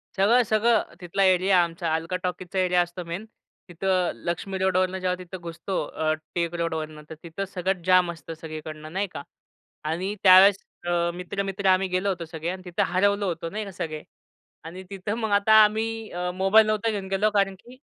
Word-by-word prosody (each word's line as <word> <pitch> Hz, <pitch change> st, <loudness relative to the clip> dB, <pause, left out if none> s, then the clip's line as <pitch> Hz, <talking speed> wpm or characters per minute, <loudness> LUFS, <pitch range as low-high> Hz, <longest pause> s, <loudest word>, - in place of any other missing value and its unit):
सगळं-सगळं 220 Hz, +2 st, +3 dB, 0.2 s
तिथला 180 Hz, +3 st, 0 dB
एरिया 185 Hz, 0 st, +4 dB
आमचा 165 Hz, -1 st, -3 dB
अल्का 165 Hz, +3 st, -3 dB
टॉकीजचा 180 Hz, +1 st, -3 dB
एरिया 180 Hz, -1 st, +3 dB
असतो 175 Hz, +1 st, -4 dB
मेन. 170 Hz, +6 st, -5 dB, 0.4 s
तिथं 180 Hz, 0 st, 0 dB
लक्ष्मी 185 Hz, +3 st, -3 dB
रोडवरनं 185 Hz, 0 st, +1 dB
जेव्हा 185 Hz, 0 st, 0 dB
तिथं 185 Hz, +1 st, -8 dB
घुसतो 170 Hz, +3 st, -5 dB
अ, 155 Hz, 0 st, -1 dB, 0.2 s
टिळक 170 Hz, -1 st, -1 dB
रोडवरनं, 155 Hz, -2 st, -3 dB
तर 160 Hz, -, -7 dB
तिथं 170 Hz, +4 st, -5 dB
सगळं 185 Hz, 0 st, -2 dB
जाम 185 Hz, -2 st, +4 dB
असतं 165 Hz, 0 st, -9 dB
सगळीकडनं, 155 Hz, -1 st, -8 dB
नाही 195 Hz, +1 st, -1 dB
का? -, -, -5 dB, 0.6 s
आणि 180 Hz, +6 st, -2 dB
त्यावेळेस 190 Hz, +1 st, +8 dB, 0.3 s
अ, 170 Hz, 0 st, +1 dB
मित्र-मित्र, 195 Hz, +2 st, -4 dB
आम्ही 185 Hz, +1 st, +3 dB
गेलो 185 Hz, +2 st, 0 dB
होतो 180 Hz, -3 st, -3 dB
सगळे, 160 Hz, +1 st, -5 dB
आणि 185 Hz, 0 st, -5 dB
तिथं 180 Hz, +3 st, 0 dB
हरवलं 200 Hz, +2 st, +2 dB
होतो, 170 Hz, -2 st, -3 dB
नाही 215 Hz, +2 st, -4 dB
का, 195 Hz, -, -8 dB
सगळे. 155 Hz, -3 st, -5 dB, 0.6 s
आणि 180 Hz, +4 st, -8 dB
तिथं 195 Hz, +1 st, -4 dB
मग 220 Hz, -3 st, -2 dB
आता 200 Hz, +2 st, +4 dB
आम्ही 220 Hz, +1 st, -1 dB
अ, 180 Hz, +1 st, -3 dB
मोबाईल 195 Hz, +4 st, +5 dB
नव्हतो 215 Hz, +1 st, 0 dB
घेऊन 200 Hz, -2 st, -4 dB
गेलो, 195 Hz, +3 st, +1 dB
कारण 195 Hz, -2 st, +1 dB
की 250 Hz, +2 st, -16 dB
185 Hz, 180 wpm, -25 LUFS, 170-200 Hz, 0.6 s, त्यावेळेस